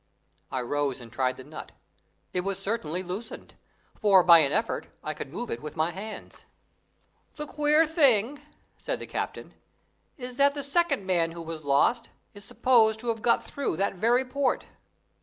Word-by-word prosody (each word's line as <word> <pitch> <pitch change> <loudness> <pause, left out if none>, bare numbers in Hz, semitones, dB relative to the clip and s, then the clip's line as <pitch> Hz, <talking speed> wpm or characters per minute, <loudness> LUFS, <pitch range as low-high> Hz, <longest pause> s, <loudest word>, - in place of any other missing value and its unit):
I 130 - -1
rose 140 +1 -1
and 115 -2 -12
tried 130 +2 -1
the 130 - -9
nut. 150 +3 -10 0.6
It 180 - +1
was 195 +1 -2
certainly 195 -4 -3
loosened, 190 +6 -7 0.5
for 195 -4 +6
by 170 -1 +8
an 140 -3 +3
effort 225 +6 -1 0.2
I - - -3
could - - -8
move 240 - -5
it 115 - -4
with 150 0 -7
my 160 +1 0
hands. 210 +4 -9 0.9
"The 300 - -4
queer 300 +2 +3
thing," 280 -4 +3 0.4
said - - -3
the - - -6
captain, - - -5 0.6
"is 250 -2 -7
that 280 0 +4
the 285 - -2
second 280 - +1
man 170 -3 +1
who 170 - -7
was 160 -1 -7
lost 145 - +2 0.2
is 205 -1 -12
supposed 220 -1 +3
to 240 - -3
have 225 -1 -2
got 235 - +3
through 280 - -3
that 195 +2 0
very 235 +7 +2
port. 265 0 -1
205 Hz, 175 wpm, -27 LUFS, 165-255 Hz, 0.9 s, by